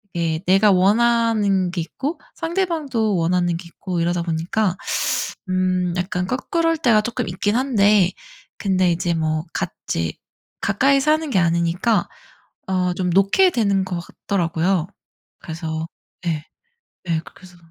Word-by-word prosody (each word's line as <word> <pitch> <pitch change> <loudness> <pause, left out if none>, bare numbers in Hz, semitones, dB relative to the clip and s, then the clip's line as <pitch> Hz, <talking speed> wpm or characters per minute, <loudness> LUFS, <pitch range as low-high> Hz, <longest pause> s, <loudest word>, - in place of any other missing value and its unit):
예 165 -2 0
내가 195 +3 +5
원하는 205 -1 +3
게 180 - -4
있고 275 - -4 0.2
상대방도 320 - -1
원하는 175 0 +1
게 170 - -10
있고 175 0 -5
이러다 175 +1 0
보니까 170 +4 -1 0.7
음 185 -1 +1
약간 180 0 -2
껄끄러울 330 - 0
때가 235 -8 +4
쪼끔 240 0 -3
있긴 205 +5 -1
한데 210 -7 +3 0.5
근데 185 -3 +2
이제 170 0 0
뭐 155 -1 -1
같이 80 -2 -3 0.5
가까이 270 +8 +3
사는 310 +2 +1
게 200 - +2
아니니까 170 +4 +1 0.6
어 180 -1 0
좀 180 0 -1
놓게 195 - +4
되는 200 - +1
것 185 -2 -4
같더라고요. 175 -1 -1 0.5
그래서 160 -1 -4 0.4
예. 155 -3 -1 0.6
예 165 -1 +1
그래서 180 -1 -16
185 Hz, 260 characters per minute, -21 LUFS, 170-225 Hz, 0.7 s, 내가